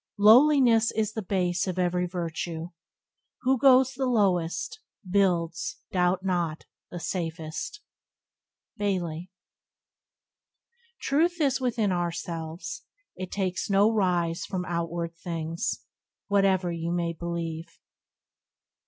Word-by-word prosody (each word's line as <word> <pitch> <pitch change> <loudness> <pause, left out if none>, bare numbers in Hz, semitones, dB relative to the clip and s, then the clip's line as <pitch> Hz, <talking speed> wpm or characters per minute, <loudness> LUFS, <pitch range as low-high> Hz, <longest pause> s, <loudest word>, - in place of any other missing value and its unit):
"Lowliness 230 +1 +6
is 220 -1 -1
the 220 - -3
base 180 -2 0
of 185 -1 -3
every 180 0 +1
virtue: 170 -1 -4 0.7
Who 260 0 +2
goes 260 0 +6
the 265 0 -1
lowest, 185 - +1 0.3
builds, 175 -3 +1
doubt 180 +1 +1
not, 175 -4 -1 0.2
the 175 - -6
safest." 165 - -4 1.0
—Bailey. 180 -4 -2 1.7
"Truth 340 +5 +1
is 270 -3 +2
within 225 -5 +1
ourselves; 170 - -4 0.3
it 185 0 -6
takes 190 -1 -2
no 200 +2 +4
rise 175 -5 +1
From 180 -2 -3
outward 170 -1 -3
things, 165 -1 -3 0.5
whate'er 195 -3 +3
you 170 0 -3
may 170 -1 -1
believe." 165 -1 -4
180 Hz, 100 wpm, -27 LUFS, 170-210 Hz, 1.7 s, Lowliness